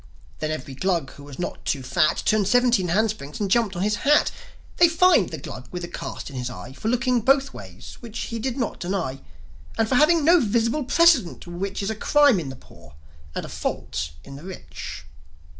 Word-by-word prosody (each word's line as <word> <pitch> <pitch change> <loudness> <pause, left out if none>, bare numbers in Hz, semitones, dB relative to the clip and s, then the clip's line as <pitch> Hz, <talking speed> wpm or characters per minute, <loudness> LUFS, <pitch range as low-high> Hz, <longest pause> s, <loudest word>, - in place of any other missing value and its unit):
Then 155 - -2
every 140 -3 -5
Glug 170 -1 -1
who 140 - -13
was 140 -2 -11
not 175 - -5
too 135 -3 -1
fat 155 +5 +1
Turned 210 -3 +2
seventeen 245 -4 +3
handsprings, 195 -6 -1
and 200 -3 -2
jumped 225 -4 +2
on 175 - -2
his 210 0 +1
hat. 295 +5 +3 0.5
They 345 - +6
fined 330 - +4
the 160 - -5
Glug 130 -2 -9
with 180 0 -6
the - - -4
cast 175 - -7
in - - -10
his 125 -1 -3
eye 125 +1 -9
For 215 - -6
looking 250 +1 +1
both 270 +3 +3
ways 95 -2 -11
which 230 -2 -9
he 230 - -4
did 250 +2 -3
not 240 -5 -2
deny 175 -8 -3 0.6
And 225 - +2
for 260 - -1
having 305 +4 +4
no 345 +2 +6
visible 235 +3 +1
precedent, 310 - +3
which 190 +3 -4
Is 200 - -1
a - - -4
crime 285 -1 +4
in 150 -5 -5
the 130 - -7
poor 70 - -17 0.4
and - - -3
a - - -9
fault 75 0 -4
in 140 - -10
the 145 - -12
rich. 80 - -8
200 Hz, 210 wpm, -24 LUFS, 150-245 Hz, 0.6 s, They